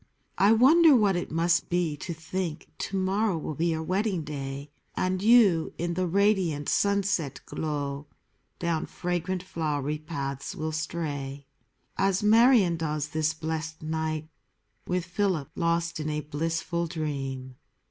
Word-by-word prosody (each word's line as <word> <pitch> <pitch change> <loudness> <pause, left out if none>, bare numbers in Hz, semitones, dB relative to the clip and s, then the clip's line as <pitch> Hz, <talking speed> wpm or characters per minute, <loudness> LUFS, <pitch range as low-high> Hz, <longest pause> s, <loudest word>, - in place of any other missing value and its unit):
I 200 +2 +6
wonder 290 +7 +7
what 205 -5 +3
it 175 - -2
must 170 +2 +1
be 175 -4 0
to 175 - -6
think 165 0 -4
To 195 - -2
morrow 190 0 +1
will 155 - -4
be 165 +4 0
your 160 -1 -1
wedding 190 0 0
day, 140 -1 -6 0.2
And 185 0 0
you, 205 -7 +5
in 170 +1 -2
the 185 +1 0
radiant 185 -6 +2
sunset 200 -8 +1
glow 145 -2 -3 0.5
Down 170 -2 -1
fragrant 180 +1 -2
flowery 150 -4 -2
paths 140 -4 -5
will 155 0 -3
stray. 145 -3 -4 0.5
As 195 0 +2
Marion 220 -5 +5
does 150 -2 -2
this 155 0 0
blessed 160 0 -4
night, 155 0 -2 0.6
With 180 0 -1
Philip, 175 -5 -1
lost 170 0 0
in 155 0 -2
a 150 0 -1
blissful 165 +3 -2
dream. 135 -5 -4
165 Hz, 135 wpm, -27 LUFS, 150-185 Hz, 0.6 s, wonder